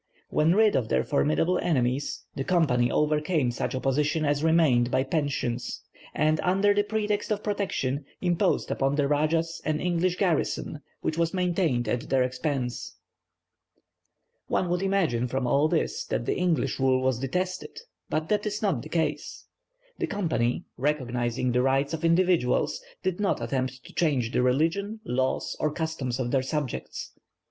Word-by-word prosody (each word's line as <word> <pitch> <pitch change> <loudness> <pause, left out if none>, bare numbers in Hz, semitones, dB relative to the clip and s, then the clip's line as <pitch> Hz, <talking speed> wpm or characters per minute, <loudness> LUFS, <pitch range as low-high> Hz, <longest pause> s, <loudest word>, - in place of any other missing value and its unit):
When 160 +4 +3
rid 215 0 +4
of 115 -4 0
their 65 0 +2
formidable 75 - +1
enemies, 135 -4 0
the 135 - -3
Company 135 -8 +2
overcame 150 -2 +1
such 120 - -3
opposition 145 +4 +1
as 145 0 +1
remained 155 -7 +4
by 130 0 +2
pensions; 135 -4 -2 0.3
and, 155 +1 +2
under 195 +3 +3
the 205 - +3
pretext 210 0 -1
of 210 0 -1
protection, 150 -10 -1
imposed 175 -2 +1
upon 135 +1 +1
the 145 -1 +2
rajahs 160 +3 0
an 155 0 0
English 180 0 +1
garrison 165 -4 0 0.2
which 160 - -2
was 170 +2 +1
maintained 175 - +1
at 120 +2 -2
their 130 -1 +3
expense. 125 0 -3 1.5
One 180 - 0
would 175 +1 0
imagine 180 -12 +1
from 130 +1 -2
all 140 +5 +3
this 60 - -1
that - - -2
the - - 0
English 180 -5 0
rule 130 -1 +2
was 130 -2 +1
detested; 180 - -3 0.3
but 155 0 -1
that 210 0 +1
is 210 0 -2
not 190 - 0
the - - -10
case. 155 -3 -2 0.5
The - - 0
Company, 160 - -1
recognizing 125 -3 -1
the 125 +1 +2
rights 135 +3 +1
of 160 0 -4
individuals, 170 - +2 0.2
did 185 0 -1
not 205 -1 +1
attempt 130 +2 -3
to - - -14
change 135 -9 +1
the - - +1
religion, 165 - +1
laws, 130 -3 -1
or 155 - +1
customs 150 -6 -3
of 120 -2 -1
their 135 - +3
subjects. 135 0 -4
150 Hz, 155 wpm, -27 LUFS, 130-175 Hz, 1.5 s, rid